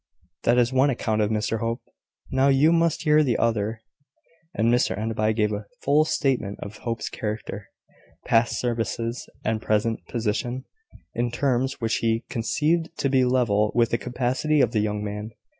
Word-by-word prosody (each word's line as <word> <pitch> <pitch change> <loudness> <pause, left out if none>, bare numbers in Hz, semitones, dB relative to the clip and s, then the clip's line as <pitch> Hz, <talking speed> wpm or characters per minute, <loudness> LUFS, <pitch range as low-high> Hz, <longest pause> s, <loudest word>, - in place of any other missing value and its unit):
"That 120 +1 +4
is 120 +1 +3
one 130 +2 +4
account 110 -4 0
of 105 - +1
Mr 110 +1 -1
Hope: 115 +1 -2 0.5
now 135 +1 +3
you 140 +4 +5
must 165 -1 +2
hear 150 -1 +5
the 125 -7 +1
other." 110 -1 0 0.7
And 115 +2 +2
Mr 125 - +1
Enderby 110 0 0
gave 105 -1 +1
a 105 0 -5 0.2
full 150 +2 +4
statement 130 -10 -1
of 100 +1 -8
Hope's 115 -2 -4
character, 105 -2 -5 0.6
past 115 +1 +2
services, 115 0 -2 0.2
and 110 0 0
present 110 +1 +1
position, 120 +3 -2 0.5
in 120 +1 0
terms 130 +1 0
which 115 -2 0
he 115 0 0
conceived 155 +8 0
to 140 - 0
be 130 -1 +3
level 115 -5 +2
with 120 -1 +3
the 120 - +1
capacity 130 +5 0
of 125 -5 +3
the 110 - +1
young 105 0 -1
man. 105 +1 -5
115 Hz, 165 wpm, -25 LUFS, 110-130 Hz, 0.7 s, you